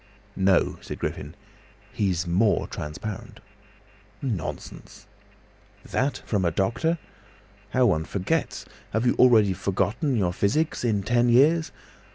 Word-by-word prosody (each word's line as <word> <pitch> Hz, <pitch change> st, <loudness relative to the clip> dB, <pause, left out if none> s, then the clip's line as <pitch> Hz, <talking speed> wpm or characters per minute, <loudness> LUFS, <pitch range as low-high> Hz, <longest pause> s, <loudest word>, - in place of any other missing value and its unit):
"No," 95 Hz, -1 st, +2 dB
said -, -, -7 dB
Griffin. 75 Hz, +3 st, -5 dB, 0.6 s
"He's 90 Hz, -4 st, 0 dB
more 95 Hz, +5 st, +2 dB
transparent!" 95 Hz, +7 st, -7 dB, 0.8 s
"Nonsense!" 110 Hz, -, -6 dB, 0.8 s
"That 135 Hz, +2 st, -1 dB
from 100 Hz, -4 st, 0 dB
a 85 Hz, -, +3 dB
doctor! 115 Hz, -, 0 dB, 0.7 s
How 130 Hz, -1 st, +2 dB
one 80 Hz, -8 st, +2 dB
forgets! 95 Hz, +1 st, -2 dB, 0.3 s
Have 110 Hz, +3 st, 0 dB
you 120 Hz, -, +4 dB
already 110 Hz, -6 st, +6 dB
forgotten 105 Hz, -, -1 dB
your 90 Hz, -6 st, +1 dB
physics, 125 Hz, -, 0 dB
in 105 Hz, -5 st, +1 dB
ten 120 Hz, +3 st, +2 dB
years? 155 Hz, +7 st, +4 dB
105 Hz, 115 wpm, -25 LUFS, 95-125 Hz, 0.8 s, already